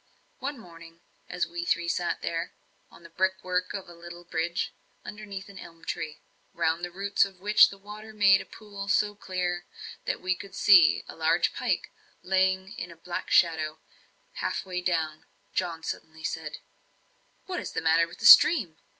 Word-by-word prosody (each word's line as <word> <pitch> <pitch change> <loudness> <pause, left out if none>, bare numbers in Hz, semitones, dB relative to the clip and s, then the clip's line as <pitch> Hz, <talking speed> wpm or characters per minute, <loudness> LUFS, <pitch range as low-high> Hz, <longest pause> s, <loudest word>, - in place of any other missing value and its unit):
One 280 +1 -4
morning, 170 -5 -14 0.3
as 180 - -1
we 170 0 -5
three 175 0 0
sat 170 0 -1
there, 165 0 -3 0.4
on - - -17
the 170 - -13
brick 190 +2 0
work 180 0 -1
of 195 -2 -6
a 175 - -12
little 175 +1 -11
bridge, 170 0 -2 0.3
underneath 205 -1 -8
an 200 -1 -12
elm 165 -1 -13
tree, 155 -1 -4 0.4
round 165 +2 0
the 175 - -2
roots 195 +3 +1
of 195 -2 -6
which 210 +3 +6
the 200 - -11
water 210 +2 -10
made 205 -2 +5
a - - -10
pool 200 -2 -9
so 205 +1 +2
clear, 180 -3 -3 0.4
that - - -2
we 185 0 0
could 195 +2 -10
see 180 -6 +6
a - - -9
large 165 +2 +2
pike - - -2 0.3
lying 190 +1 +1
like 180 - -5
a 170 - -12
black 175 +2 -6
shadow, 160 -2 +3 0.6
half - - -2
way 180 -1 -3
down; 160 -3 -1 0.3
John 170 -3 -2
suddenly 160 0 -7
said: 155 -2 -4 0.9
"What 370 -2 -3
is - - -7
the - - -1
matter 165 +1 +3
with 170 - -13
the - - -5
stream? 205 - +8
180 Hz, 175 wpm, -27 LUFS, 165-195 Hz, 0.9 s, stream